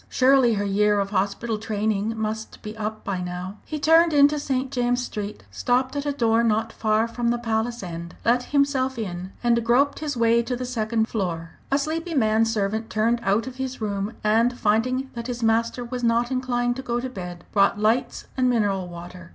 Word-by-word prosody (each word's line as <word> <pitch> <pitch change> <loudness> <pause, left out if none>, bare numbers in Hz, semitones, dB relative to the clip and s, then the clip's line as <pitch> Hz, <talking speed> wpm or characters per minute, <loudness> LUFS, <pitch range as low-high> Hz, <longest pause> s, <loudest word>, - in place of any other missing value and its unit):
Surely 260 -3 +4
her 205 0 -1
year 205 +1 +2
of 200 0 -2
hospital 205 +3 -1
training 215 0 -1
must 220 0 -4
be 215 0 -6
up 215 0 -4
by 195 -4 -2
now? 180 +3 -5
He 310 - -3
turned 325 +2 +5
into 290 +1 +5
St. 265 -2 -2
James 245 -1 +1
Street, 210 -2 -6
stopped 255 - 0
at 285 0 -2
a - - +2
door 230 -4 +2
not 225 0 +1
far 220 +1 +1
from 235 +1 -3
the 240 +1 +2
Palace 230 0 -2
end, 170 -1 -7
let 245 +1 +3
himself 275 -2 +1
in, 185 -4 -5
and 235 -1 +3
groped 255 +5 +2
his 295 -4 -3
way 230 0 +4
to 240 +2 -3
the 250 +1 -4
second 225 -2 0
floor. 170 -7 -3 0.2
A 275 - +4
sleepy 320 +3 -2
man 220 -3 +3
servant 220 0 -1
turned 230 +2 +1
out 205 +3 +1
of 255 -1 -8
his 265 -1 -4
room, 205 0 -2
and 230 +3 +3
finding 255 +5 +1
that 235 0 -5
his 245 -1 -4
master 230 +2 +1
was 245 0 -5
not 235 +1 +2
inclined 245 -1 0
to - - -4
go 240 -2 -2
to 255 - -3
bed, 180 -8 -7
brought 200 0 +3
lights 220 +4 +1
and 255 -1 +2
mineral 200 -6 +1
water. 175 0 -10
230 Hz, 200 wpm, -24 LUFS, 210-255 Hz, 0.2 s, turned